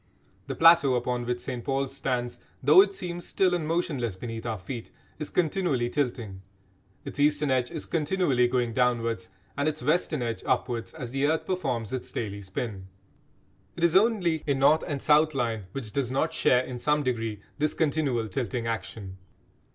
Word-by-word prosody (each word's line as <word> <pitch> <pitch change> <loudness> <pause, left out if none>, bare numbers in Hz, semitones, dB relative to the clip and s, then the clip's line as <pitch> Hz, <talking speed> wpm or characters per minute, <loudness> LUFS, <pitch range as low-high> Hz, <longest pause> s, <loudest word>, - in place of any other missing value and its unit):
The - - -3
plateau 165 -5 +6
upon 120 0 -1
which 120 0 -1
St 125 -3 -5
Paul's 135 -1 -1
stands, 125 -3 -2 0.2
though 150 +8 +8
it 200 0 +2
seems 175 -2 -5
still 185 0 +1
and 165 -3 -1
motionless 150 - -1
beneath 115 +3 -6
our 110 -2 -2
feet, 115 +5 -7 0.3
is 150 - -3
continually 155 -8 0
tilting; 120 -9 -2 0.6
its - - -7
eastern 145 -1 +2
edge 125 -2 +1
is 160 - -4
continually 150 -6 +1
going 120 -2 0
downwards 115 -6 0 0.3
and 145 +1 0
its 150 - -6
western 155 -2 +1
edge 115 -1 -3
upwards, 120 -2 -1
as 120 -2 -6
the 135 +2 +1
earth 160 +1 0
performs 130 - -2
its 130 - -4
daily 100 -3 -4
spin. 95 0 -5 0.9
It 170 - -5
is 170 0 +4
only 190 -6 +3
a 140 - +2
north 145 +4 +4
and 140 -2 -3
south 155 0 +4
line 115 -6 -1
which 115 -4 -5
does 135 -1 -1
not 135 - 0
share 125 0 +3
in 125 -1 -6
some 150 +3 +1
degree 115 -5 -2 0.2
this 150 0 0
continual 140 -7 0
tilting 120 +3 -3
action. 100 -3 -5
130 Hz, 175 wpm, -27 LUFS, 115-155 Hz, 0.9 s, though